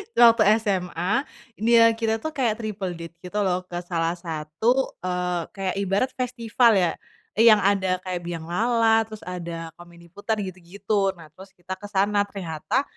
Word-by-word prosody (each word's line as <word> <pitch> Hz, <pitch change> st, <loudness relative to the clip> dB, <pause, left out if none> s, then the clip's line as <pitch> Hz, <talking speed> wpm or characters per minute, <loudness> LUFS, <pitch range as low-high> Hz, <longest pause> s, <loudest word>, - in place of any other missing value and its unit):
tuh -, -, +6 dB
waktu -, -, +3 dB, 0.2 s
SMA, 180 Hz, -3 st, -1 dB, 0.5 s
dia 230 Hz, +1 st, +5 dB
kita 225 Hz, 0 st, 0 dB
itu 315 Hz, -, -4 dB
kayak 245 Hz, -7 st, +1 dB
triple 210 Hz, -5 st, -4 dB
date 165 Hz, 0 st, -9 dB
gitu 180 Hz, +3 st, -6 dB
loh, 180 Hz, -1 st, +1 dB
ke 175 Hz, -, -5 dB
salah 170 Hz, -1 st, -1 dB
satu, 170 Hz, -, -1 dB
eee, 180 Hz, -1 st, -1 dB
kayak 195 Hz, -2 st, -3 dB
ibarat 200 Hz, +5 st, +1 dB
festival 245 Hz, -1 st, +2 dB
ya, 175 Hz, -3 st, +2 dB, 0.5 s
yang 220 Hz, -2 st, +7 dB
ada 190 Hz, -2 st, +1 dB
kayak 185 Hz, -1 st, -4 dB
bianglala, 225 Hz, +7 st, +1 dB
terus 215 Hz, -1 st, -10 dB
ada 170 Hz, -2 st, -6 dB
komedi 170 Hz, 0 st, -15 dB
putar 205 Hz, +4 st, -3 dB
gitu-gitu. 195 Hz, +2 st, -2 dB
Nah 165 Hz, -4 st, -14 dB
terus 190 Hz, +4 st, -15 dB
kita 180 Hz, +1 st, -7 dB
kesana, 205 Hz, 0 st, 0 dB
ternyata 185 Hz, -, -2 dB
190 Hz, 155 wpm, -24 LUFS, 175-220 Hz, 0.5 s, yang